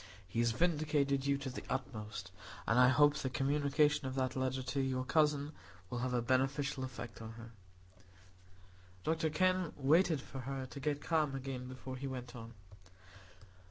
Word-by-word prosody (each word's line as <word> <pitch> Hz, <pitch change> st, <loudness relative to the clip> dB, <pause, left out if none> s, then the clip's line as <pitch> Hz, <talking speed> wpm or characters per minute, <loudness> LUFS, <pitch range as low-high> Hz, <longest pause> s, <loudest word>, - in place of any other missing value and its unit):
He 95 Hz, -, -3 dB
has 120 Hz, 0 st, +4 dB
vindicated 145 Hz, -1 st, +1 dB
you 140 Hz, 0 st, +3 dB
to 135 Hz, -1 st, -5 dB
the -, -, -6 dB
utmost; 110 Hz, -6 st, -4 dB, 0.4 s
and 115 Hz, -, +4 dB
I 125 Hz, -, +8 dB
hope 145 Hz, +3 st, +5 dB
the 130 Hz, -, -2 dB
communication 140 Hz, +2 st, +2 dB
of 130 Hz, -, -4 dB
that 130 Hz, -1 st, 0 dB
letter 130 Hz, 0 st, -1 dB
to 135 Hz, +2 st, -2 dB
your 130 Hz, -1 st, -1 dB
cousin 150 Hz, 0 st, +2 dB, 0.4 s
will 120 Hz, -, -2 dB
have 125 Hz, 0 st, -1 dB
a 120 Hz, -, +1 dB
beneficial 135 Hz, +2 st, +1 dB
effect 120 Hz, -4 st, -7 dB
on 110 Hz, 0 st, -7 dB
her." 115 Hz, 0 st, -10 dB, 1.5 s
Dr 160 Hz, +3 st, +1 dB
Kenn 185 Hz, 0 st, +2 dB
waited 160 Hz, +3 st, +4 dB
for 135 Hz, 0 st, -8 dB
her 135 Hz, +1 st, -4 dB
to 140 Hz, +2 st, -8 dB
get 145 Hz, +1 st, -1 dB
calm 155 Hz, -4 st, +1 dB
again 130 Hz, -1 st, -4 dB
before 130 Hz, 0 st, -7 dB
he 135 Hz, +2 st, -4 dB
went 125 Hz, -2 st, -6 dB
on. 115 Hz, -1 st, -9 dB
135 Hz, 165 wpm, -35 LUFS, 125-145 Hz, 1.5 s, I